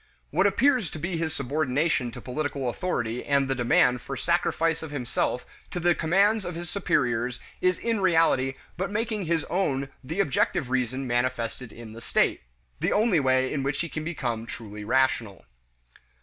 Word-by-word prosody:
What - - +4
appears 255 - +3
to - - -8
be 170 +3 -2
his 160 -1 -1
subordination 140 0 0
to - - -7
political 140 0 -3
authority 120 -6 -2
and 140 -1 +2
the 135 - +1
demand 125 0 +3
for 135 - -5
sacrifice 165 +1 +1
of 160 - -6
himself 125 -2 -1 0.2
to 180 - -4
the 175 0 +4
commands 200 +7 +3
of 175 -2 -5
his 170 -1 -6
superiors 125 - 0 0.2
is 185 -1 +3
in 230 -2 -1
reality 165 -7 +3 0.2
but 190 +2 -1
making 215 -1 -1
his 165 -1 +1
own 140 -7 -1
the 165 +9 -4
objective 135 -6 +1
reason 130 +1 0
manifested 120 -1 -1
in 115 -2 -10
the 115 - -10
state - - +1 0.4
the - - +1
only 210 -5 +3
way 130 -1 +2
in 145 - -1
which 140 +1 -1
he 170 - -3
can 155 - -4
become 120 -9 -3
truly 105 -3 -7
rational. 120 -4 +1
140 Hz, 170 wpm, -26 LUFS, 125-175 Hz, 0.4 s, What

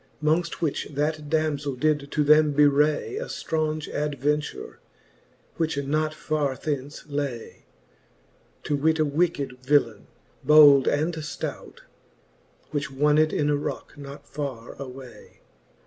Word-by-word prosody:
Mongft 160 +2 +1
which 155 -4 -1
that 150 +1 -2
damzeli 145 -4 -1
did 145 -1 +1
to 150 - +1
them 150 0 +5
bewray 150 - +2
A - - -3
ftraunge 155 -1 -2
adventure, 150 0 -2 0.8
which 160 -3 -1
not 155 +2 0
farre 150 -4 -1
thence 145 -1 -5
lay; 140 -5 -5 1.0
To 145 - -1
weete 160 +3 +2
a 155 - +3
wicked 145 -4 -1
villaine, 125 -6 +1 0.4
bold 145 -3 +7
and 155 +4 +1
flout. 150 - -7 0.9
Which 145 -1 -2
wonned 150 +3 +2
in 150 0 +1
a - - +2
rocke 145 - -5
not 140 0 -10
farre 135 -5 -6
away. 130 -2 -11
150 Hz, 120 wpm, -25 LUFS, 140-155 Hz, 1.0 s, bold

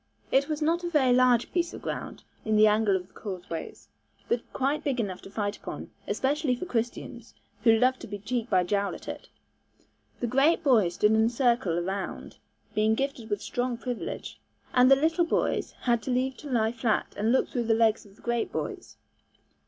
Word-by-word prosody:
It 275 +2 +3
was 305 0 -1
not 335 +3 +1
a 345 - -2
very 270 -6 +3
large 250 -2 +4
piece 345 -1 -1
of - - -10
ground - - -5 0.2
in 220 0 +1
the 215 0 +7
angle 210 -1 +3
of 180 -1 -2
the - - -30
causeways, 180 -5 -7 0.4
but 235 0 -2
quite 275 +3 -1
big 270 -4 -1
enough 190 -5 -3
to - - -11
fight 205 0 -2
upon, - - -8 0.2
especially 280 -1 0
for 255 - -5
Christians, 235 -2 -4 0.3
who 225 -1 +6
loved 255 +2 +2
to - - -9
be 205 - -5
cheek 235 +3 -3
by 185 -3 +3
jowl 200 +2 0
at - - -12
it. - - -7 0.9
The - - -1
great 275 +8 +3
boys 215 - +3
stood 210 - +3
in 220 0 +4
a - - +3
circle 235 -8 +1
around, 190 +3 -4 0.4
being 215 +1 +2
gifted 270 -3 -3
with 205 -1 -2
strong 245 -1 -2
privilege, 245 -1 -5 0.3
and 250 0 +6
the 270 - +8
little 320 +5 +2
boys 335 - 0
had 235 -2 0
leave 260 +1 0
to 295 - -9
lie 225 -3 +2
flat 230 -2 -1
and 215 +3 +1
look 260 - +2
through 240 -2 -2
the 225 0 +3
legs 225 -1 +3
of 200 -2 -18
the - - -22
great 235 -1 -1
boys. - - -5
235 Hz, 200 wpm, -27 LUFS, 215-265 Hz, 0.9 s, the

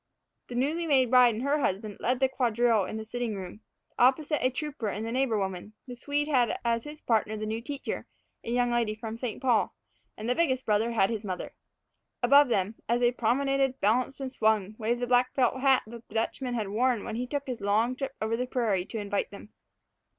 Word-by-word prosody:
The 245 - -7
newly 310 +7 0
made 260 -5 +3
bride 250 -3 +6
and 230 - -4
her 285 +2 +1
husband 205 -4 -2
led 250 +1 0
the 265 - +4
quadrille 240 -4 +2
in 215 - -5
the 220 - -6
sitting 235 -1 -3
room, 190 +2 -8 0.4
opposite 280 +5 +3
a 255 - +4
trooper 270 -3 -4
and 210 +2 -3
the 230 - -3
neighbor 255 -3 +1
woman; 190 +1 -4
the 250 - -8
Swede 290 +4 -1
had 255 -6 +2
as 230 -1 0
his 300 +1 -10
partner 220 -2 +1
the 215 - -4
new 220 +1 -3
teacher, 285 +3 -5 0.4
a - - -6
young 245 0 +1
lady 230 -3 0
from 220 0 -6
St. 230 -1 -4
Paul; 245 -4 +1 0.4
and 215 - -5
the 250 - +3
biggest 260 -5 +1
brother 220 +2 +1
had 195 -2 +3
his 220 -2 -3
mother. 185 -3 -5 0.7
Above 280 +3 +7
them, 210 -2 0
as 235 +1 +3
they 240 0 +3
promenaded, 270 +3 +1
balanced, 245 +7 +1
and 265 -1 -4
swung, 215 -4 +1
waved 235 +2 -1
the - - +1
black 245 +1 +2
felt 260 0 +1
hat 270 -1 +4
that 235 +1 -11
the - - -15
Dutchman 245 +2 -1
had 215 -4 -2
worn 235 +1 +1
when 220 - -5
he 250 +1 -3
took 285 +1 -3
his 250 -5 -5
long 220 +5 +1
trip 270 +1 -5
over 220 +1 0
the 250 +2 -2
prairie 220 -8 0
to 225 - -6
invite 205 -1 -2
them. 205 +1 -12
240 Hz, 215 wpm, -28 LUFS, 220-260 Hz, 0.7 s, Above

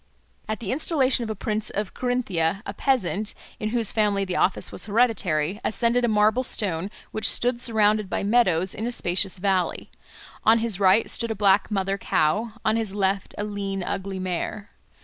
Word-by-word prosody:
At 215 - -2
the 200 - -3
installation 270 -3 +2
of 225 - -5
a 220 - -3
prince 215 +1 -2
of 205 -1 -4
Carinthia 205 -8 -1
a 200 - -5
peasant, 215 -4 0 0.2
in 215 - -2
whose 230 -2 +4
family 205 -2 +1
the 185 -1 -4
office 185 - +1
was - - -2
hereditary, 205 -6 +1
ascended 235 +2 +1
a - - +3
marble 215 +2 +3
stone 190 -7 -1 0.2
which 215 - 0
stood 240 0 +1
surrounded 215 -3 +2
by - - -2
meadows 190 -5 +2
in 220 +2 -4
a - - -2
spacious 190 -3 0
valley; 185 -1 -1 0.5
on 225 +1 +5
his 225 -4 -1
right 195 +3 +4
stood 230 - -1
a 220 - -2
black 200 -1 +3
mother 195 -1 -1
cow, 210 +10 0
on 220 +1 +2
his 215 -3 -2
left 195 -1 -1
a 205 - -2
lean 200 -2 -4
ugly 195 +1 -4
mare. 185 +3 -4
210 Hz, 180 wpm, -24 LUFS, 195-225 Hz, 0.5 s, on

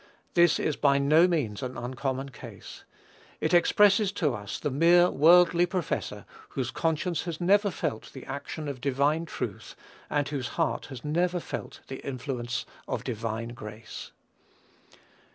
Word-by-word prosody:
This 175 -2 +5
is 155 - -1
by 140 -1 +4
no 155 +5 +5
means 135 - -1
an 130 -1 -5
uncommon 130 +2 -3
case. 130 - -11 0.5
It - - 0
expresses 200 +3 +5
to 150 -9 0
us 105 -2 -5
the 145 - -2
mere 170 +5 +5
worldly 175 +3 +6
professor, 180 -2 -3 0.2
whose 130 -1 -3
conscience 165 +3 -1
has 170 -2 -4
never 200 +3 +4
felt 110 - -4
the 130 - -10
action 140 +2 -5
of 135 -3 -5
divine 145 +5 +1
truth, - - -5 0.3
and 145 -1 0
whose 140 -4 -3
heart 165 - 0
has 130 -2 -9
never 175 +4 +1
felt - - -7
the 135 - -7
influence 125 -2 -3 0.2
of - - -3
divine 115 0 -3
grace. 110 -1 -9
145 Hz, 145 wpm, -28 LUFS, 130-170 Hz, 0.5 s, worldly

